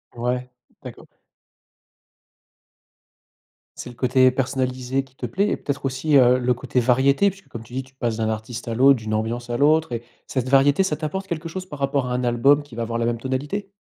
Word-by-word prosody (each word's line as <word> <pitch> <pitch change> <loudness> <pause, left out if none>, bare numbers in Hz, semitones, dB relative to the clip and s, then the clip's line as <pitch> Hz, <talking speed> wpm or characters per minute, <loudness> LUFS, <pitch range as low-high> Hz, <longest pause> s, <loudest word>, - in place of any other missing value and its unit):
Ouais, 125 +1 -2 0.3
d'accord. - - -10 2.7
C'est - - -7
le 120 - -12
côté 130 +1 +4
personnalisé 130 0 -1
qui 130 -1 -23
te 130 - -5
plaît 195 - 0
et - - -1
peut-être 140 -1 -4
aussi, 135 +3 +2
heu, 125 -1 +6
le 125 0 +1
côté 125 +1 -1
variété 135 +9 +3
puisque, 195 +1 -14
comme 115 - -8
tu 120 - -16
dis, 130 +1 -3
tu 130 0 -21
passes 120 -4 -2
d'un 110 -1 0
artiste 110 +2 -5
à 115 - -2
l'autre, 135 +3 +6
d'une 110 -1 -5
ambiance 115 +3 -2
à 120 - -1
l'autre 155 +2 +3
et 115 0 -4 0.2
cette 130 -1 -2
variété, 140 +6 +4
ça 185 -5 -1
t'apporte 190 +5 -4
quelque 165 -2 -4
chose 185 +2 -6
par 150 -6 -10
rapport 140 -1 0
à 125 - -2
un 125 0 -1
album 125 +4 +3
qui 145 -5 -14
va 120 - -4
avoir 115 0 -3
la 115 - 0
même 115 0 -1
tonalité? 145 - -3
130 Hz, 210 wpm, -22 LUFS, 120-140 Hz, 2.7 s, heu